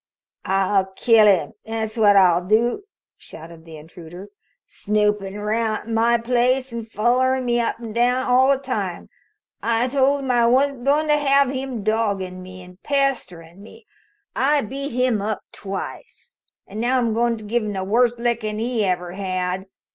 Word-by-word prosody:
"I'll 195 0 +1
kill 225 -2 +5
him, 200 +2 +2
that's 220 -1 -4
what 210 -3 +4
I'll 180 -2 +4
do!" 235 - +1 0.3
shouted 165 0 -13
the 160 -1 -11
intruder. 175 +4 -12 0.4
"Snoopin' 210 -1 -1
around 215 +1 -2
my 230 +1 +3
place, 250 +2 0
and 230 -1 -6
follerin' 255 +4 +1
me 240 0 +1
up 230 - -1
an' 230 -2 -8
down 245 +2 +1
all 255 +1 +4
the 275 - +4
time! 215 -10 -4 0.5
I 230 +1 +1
told 275 +1 +1
him 265 -2 -2
I 240 -1 +3
wasn't 265 +1 +1
goin' 295 +3 +2
to 300 0 +3
have 280 -2 +3
him 260 -5 -5
doggin' 200 -4 -1
me 185 0 -11
an' 180 +1 -16
pesterin' 195 - -2
me. 435 - -15 0.5
I've 280 -4 +1
beat 275 +1 -5
him 250 -3 0
up 210 0 -3
twice, 200 - -8 0.3
an' 210 - -8
now 245 +3 +1
I'm 235 -3 0
goin' 235 +1 0
to 215 - -11
give 235 +3 -1
him 210 -1 -4
the 190 -1 -3
worst 235 +4 +2
lickin' 235 -3 -2
he 230 0 -1
ever 180 -2 -2
had. 185 0 -3
225 Hz, 165 wpm, -21 LUFS, 195-255 Hz, 0.5 s, kill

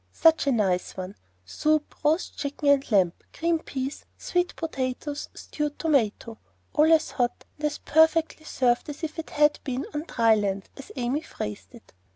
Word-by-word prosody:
Such 325 -3 +4
a - - +4
nice 195 -7 0
one! 185 +2 -6 0.3
soup, 305 - 0
roast 310 +4 +1
chicken 285 0 -1
and 280 -2 +3
lamb, 185 -5 +4 0.2
green 335 0 +1
peas, 270 -1 -5 0.3
new 355 0 +5
potatoes, 290 -3 -4
stewed 295 -1 -4
tomato; 230 -7 0 0.3
all 310 +1 +5
as 320 -1 +4
hot 245 -2 -1
and 300 - -3
as 295 - -4
perfectly 320 0 +3
served 245 -1 +1
as 295 +3 -8
if 315 -1 -3
they 325 - -2
had 295 0 +3
been 260 -1 -3
"on 295 +2 -3
dry 230 -1 +4
land," 200 -2 -1
as 275 - -11
Amy 255 +3 -1
phrased 105 - -7
it. - - -17
285 Hz, 170 wpm, -26 LUFS, 235-310 Hz, 0.3 s, new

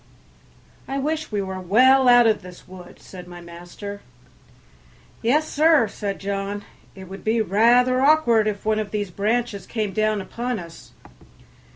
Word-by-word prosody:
"I 270 - -3
wish 310 +2 -3
we 205 -2 -1
were 190 -1 -6
well 255 +8 +4
out 245 -1 +6
of 220 -2 +2
this 180 0 -13
wood," 180 -1 -13
said 180 -2 -12
my 175 0 -11
master. 175 +4 -10 1.2
"Yes, 295 +7 +1
sir," 310 -6 +3
said 200 -1 -5
John, 200 +1 -4 0.3
"it 190 - -10
would 195 +2 -10
be 225 +1 +1
rather 240 +5 +3
awkward 265 -7 +3
if 205 -1 -4
one 215 0 +1
of 215 -1 -4
these 205 -3 -4
branches 215 +2 -2
came 215 -4 -3
down 215 -1 0
upon 240 +5 -4
us." 170 -3 -12
215 Hz, 155 wpm, -22 LUFS, 195-245 Hz, 1.2 s, out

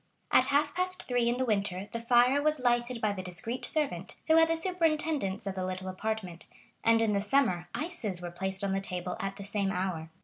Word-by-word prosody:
At - - +6
half 290 +1 +2
past 365 0 0
three 245 -2 +2
in 240 - 0
the 260 - 0
winter 200 -3 -1
the 230 - -3
fire 245 +4 +4
was 305 +1 +2
lighted 240 -1 +1
by 210 -2 +1
the 190 - -5
discreet 210 +8 -4
servant, 300 -3 -1
who 320 0 +5
had 325 0 +6
the 330 - +1
superintendence 315 - 0
of 195 - -2
the 190 -1 -3
little 185 0 -4
apartment, 185 -3 -4 0.4
and 225 0 +4
in 215 -2 +2
the 200 - +1
summer 205 -6 +1
ices 295 - -3
were 175 -1 -6
placed 190 +2 -4
on 195 -1 0
the 195 - 0
table 180 -1 -3
at 195 0 -3
the 200 - -8
same 200 0 -1
hour. 180 -4 -2
220 Hz, 215 wpm, -30 LUFS, 190-280 Hz, 0.4 s, At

